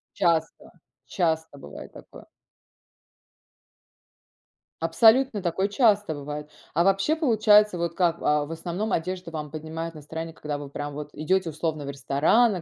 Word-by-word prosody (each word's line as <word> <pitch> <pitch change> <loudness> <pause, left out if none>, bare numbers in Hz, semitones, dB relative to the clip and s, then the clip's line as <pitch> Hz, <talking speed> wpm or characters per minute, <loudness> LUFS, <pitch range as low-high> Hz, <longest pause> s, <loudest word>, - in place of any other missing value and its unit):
Часто. 170 -4 0 0.3
Часто 160 -4 -1
бывает 75 - -10
такое. - - -13 2.6
Абсолютно, 220 +7 +4
такое 190 +3 -1
часто 210 - +3
бывает! 150 +1 -6 0.2
А 170 - +3
вообще 195 - +2
получается 215 - +4
вот 170 -1 -2
как, 170 -2 +2
а, 150 0 +2
в 150 - -9
основном, 175 +6 -3
одежда 180 0 -3
вам 150 -2 -5
поднимает 160 +2 -6
настроение, 160 +2 -7
когда 150 -2 -5
вы 145 -1 -8
прям 145 +1 -5
вот 150 +1 -6
идете, 180 +3 0
условно, 155 -1 -3
в - - -5
ресторан 140 - +2
на 185 -4 -3
165 Hz, 140 wpm, -25 LUFS, 150-195 Hz, 2.6 s, Абсолютно